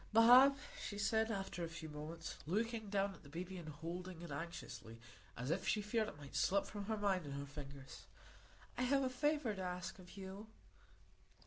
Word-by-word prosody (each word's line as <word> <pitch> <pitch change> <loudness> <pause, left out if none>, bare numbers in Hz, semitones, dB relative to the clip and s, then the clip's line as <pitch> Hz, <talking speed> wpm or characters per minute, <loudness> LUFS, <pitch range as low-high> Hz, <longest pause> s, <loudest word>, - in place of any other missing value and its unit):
"Bob," 250 +5 +9 0.3
she 205 - -4
said, 220 +1 +2
after 195 -4 -2
a - - 0
few 165 -1 -6
moments, 155 +2 -6
looking 220 +3 0
down 195 0 +1
at - - -14
the 140 - -13
baby, 180 +5 -5
and 170 -4 -6
holding 170 +3 -5
it 170 - -7
anxiously, 140 -7 -6 0.4
as 125 +5 -1
if 180 +3 0
she - - +3
feared 215 +1 +1
it 150 - -7
might 145 -2 -10
slip 200 +1 +3
from 205 0 -5
her 220 +1 0
mind 195 -3 +2
and 140 -2 -5
her 140 0 -3
fingers, 140 -1 -9 0.7
"I - - +2
have 275 +2 +4
a 260 - +1
favour 295 -2 +2
to 190 - -5
ask 180 0 -3
of 180 +2 -12
you." 195 +2 -7
190 Hz, 195 wpm, -39 LUFS, 160-220 Hz, 0.7 s, Bob